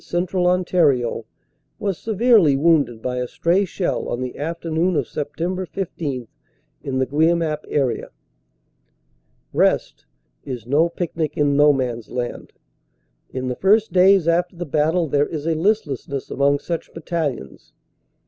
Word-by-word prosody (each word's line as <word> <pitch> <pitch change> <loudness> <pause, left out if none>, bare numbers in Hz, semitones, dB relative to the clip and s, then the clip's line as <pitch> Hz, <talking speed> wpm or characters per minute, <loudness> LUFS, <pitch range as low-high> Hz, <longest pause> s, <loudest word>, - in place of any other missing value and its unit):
Central 180 +1 0
Ontario, 155 -11 +1 0.5
was 200 -3 -2
severely 220 - +3
wounded 140 -7 +2
by 125 0 -2
a 125 0 -2
stray 175 +9 +1
shell 180 0 -2
on 120 - -2
the 125 -1 -4
afternoon 165 +3 -1
of 145 -4 +1
Sept. 145 +3 -6
IS 170 - -3 0.5
in 130 -1 -3
the 130 - +2
Guemappe 155 +1 +1
area. 130 -6 -1 1.4
"Rest" - - +1 0.4
is 125 -5 -6
no 150 +7 +2
picnic 165 -3 -3
in 145 -1 +2
No 145 +1 +6
Man 125 -4 -1
s 115 - -16
Land. 125 -1 -5 0.8
In 130 0 -4
the 125 - -2
first 210 - +3
days 190 -1 +5
after 175 +2 +1
the 175 +1 -5
battle 160 +3 +1
there 145 +1 +1
is 155 -2 -5
a 165 - +1
listlessness 155 - -1
among 140 +1 +2
such 165 +3 -5
battalions. 155 - -4
155 Hz, 140 wpm, -21 LUFS, 135-175 Hz, 1.4 s, No